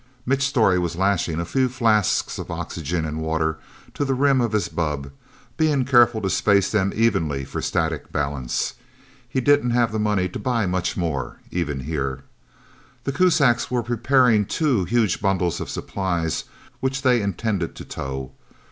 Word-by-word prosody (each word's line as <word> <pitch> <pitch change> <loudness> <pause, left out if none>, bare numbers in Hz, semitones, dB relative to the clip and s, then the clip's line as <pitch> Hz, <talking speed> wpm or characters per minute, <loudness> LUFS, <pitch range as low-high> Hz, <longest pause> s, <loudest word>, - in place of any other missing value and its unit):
Mitch 135 +2 +1
Storey 115 -10 +3
was 85 -1 -2
lashing 90 -3 0
a 85 - -2
few 130 +8 +1
flasks 115 -5 +1
of - - -6
oxygen 80 +1 -3
and 80 0 -4
water 80 0 -1 0.3
to - - -2
the 135 -1 0
rim 135 -1 +3
of 120 -2 0
his 105 -5 +1
bubb, 75 -4 -3 0.5
being 150 -5 +2
careful 120 -3 +5
to 95 - +1
space 100 +1 +3
them 100 -2 +1
evenly 80 -12 +1
for - - -5
static 80 -4 -2
balance. 70 -4 -2 0.6
He 130 - 0
didn't 145 -2 +3
have 120 -1 +2
the 110 - -2
money 105 -3 +1
to - - -6
buy 120 -4 0
much 90 -1 -1
more, 80 -6 -2
even 75 -6 -2
here. 70 -2 -3 0.8
The 135 - -1
Kuzaks 140 -7 +3
were 125 -2 0
preparing 120 -1 +3
two 130 - +1
huge 110 -1 +1
bundles 95 -4 0
of - - -5
supplies, 85 -5 -2 0.3
which 135 +1 -2
they 125 -3 +4
intended 100 -3 -2
to - - -9
tow. 65 -1 -5
100 Hz, 165 wpm, -23 LUFS, 80-125 Hz, 0.8 s, careful